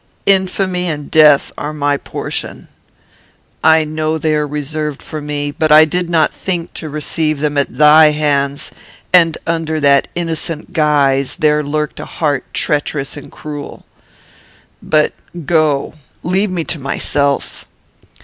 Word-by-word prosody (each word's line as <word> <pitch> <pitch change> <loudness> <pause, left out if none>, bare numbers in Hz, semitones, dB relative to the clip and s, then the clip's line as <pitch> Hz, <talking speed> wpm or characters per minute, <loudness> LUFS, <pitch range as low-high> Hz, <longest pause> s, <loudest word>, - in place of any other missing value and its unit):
"Infamy 190 -1 +1
and 150 -2 -5
death 150 -3 +5
are 150 +1 -4
my 145 -1 0
portion. - - -6 1.0
I 160 0 +5
know 155 +1 -2
they 155 0 0
are 150 0 0
reserved 150 0 -4
for 155 - -7
me; 145 0 -3
but 155 +1 -1
I 155 +1 +8
did 175 +2 -2
not 160 -2 +2
think 175 -3 -4
to 155 - -7
receive 155 0 -1
them 150 0 -1
at 140 -1 -1
thy 155 +1 +7
hands, 145 -2 -1 0.4
that 165 -3 +5
under 165 -1 -1
that 140 -1 +3
innocent 165 0 -3
guise 140 -4 +2
there 150 -3 +2
lurked 150 +1 -3
a - - -6
heart 145 -4 -2
treacherous 145 -1 -1
and 145 - -11
cruel. 145 -1 -8 1.0
But 155 -1 +1 0.3
go; 155 -3 +1 0.3
leave 190 +4 0
me 180 -3 -2
to 160 - -4
myself. 140 +1 -2
150 Hz, 140 wpm, -16 LUFS, 145-160 Hz, 1.0 s, I